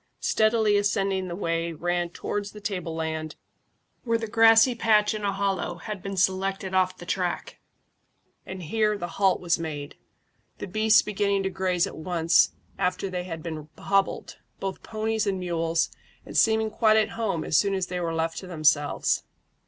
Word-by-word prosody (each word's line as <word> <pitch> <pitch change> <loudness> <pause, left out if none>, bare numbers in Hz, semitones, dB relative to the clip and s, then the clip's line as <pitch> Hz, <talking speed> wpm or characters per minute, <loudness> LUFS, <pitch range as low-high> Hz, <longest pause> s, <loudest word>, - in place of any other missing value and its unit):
Steadily 215 -1 +3
ascending 195 -2 0
the 170 - -5
way 165 -2 -1
ran 175 +2 -1
up 170 - -22
towards 205 0 -4
the 210 - -9
tableland, 160 -6 -4 0.7
where 230 -2 +1
the 225 - -4
grassy 225 +2 +6
patch 220 -3 +3
in 215 -1 -5
a 200 - +1
hollow 195 0 -1
had 210 -3 -7
been 195 0 -5
selected 190 0 0
off 185 0 +2
the 175 - -10
track, 180 0 -3 0.8
and 190 -1 -8
here 210 +5 +1
the 175 - -4
halt 195 -2 +3
was 170 -2 0
made, 150 -3 -5 0.6
the - - -5
beasts 215 +3 +4
beginning 200 -1 0
to 190 - -1
graze 185 -1 +1
at - - -8
once 170 0 +3 0.3
after 185 +1 -1
they 180 -1 -3
had 165 -3 -6
been 155 -2 -6
hobbled, 195 0 -1 0.2
both 195 -1 -4
ponies 220 0 -2
and 195 -1 0
mules, 165 -2 0 0.3
and - - -10
seeming 220 -1 +3
quite 220 0 +4
at 215 - +2
home 210 -8 -2
as - - -2
soon 200 +4 +3
as 190 -1 -1
they 180 0 -4
were 170 -1 -2
left 165 0 -1
to 185 - -10
themselves. 155 -4 +1
190 Hz, 175 wpm, -26 LUFS, 170-210 Hz, 0.8 s, grassy